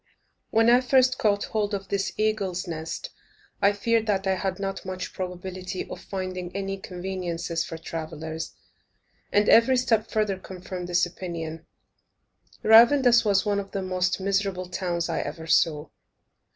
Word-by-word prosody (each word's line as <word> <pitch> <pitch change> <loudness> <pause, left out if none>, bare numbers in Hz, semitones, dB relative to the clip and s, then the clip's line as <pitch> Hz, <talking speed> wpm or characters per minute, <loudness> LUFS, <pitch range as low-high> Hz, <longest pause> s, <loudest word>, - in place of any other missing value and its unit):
When 225 +1 +3
I 245 +1 +6
first 255 0 +3
caught 205 -2 +2
hold 210 -1 -1
of 195 -1 -7
this 200 -1 -1
eagle's 200 -4 -1
nest, 165 - -5 0.5
I 200 0 +5
feared 225 +2 0
that 195 -2 +1
I 190 - +2
had 190 0 -2
not 195 -1 -3
much 185 -1 -5
probability 185 0 -5
of - - -8
finding 185 -2 -5
any 195 0 -3
conveniences 180 -3 -3
for 165 - -7
travellers, 160 0 -6 0.8
and 205 0 +3
every 255 +3 +6
step 225 -3 +1
further 210 -3 0
confirmed 185 -1 -7
this 180 0 +3
opinion. 165 -2 -6 1.0
Ravandus 235 +2 +7
was 200 -2 +2
one 205 -1 +1
of 195 0 -7
the 195 - -2
most 185 0 0
miserable 195 -1 -1
towns 175 -2 -2
I 165 - -1
ever 160 +3 -5
saw. 155 -2 +2
190 Hz, 150 wpm, -26 LUFS, 175-210 Hz, 1.0 s, Ravandus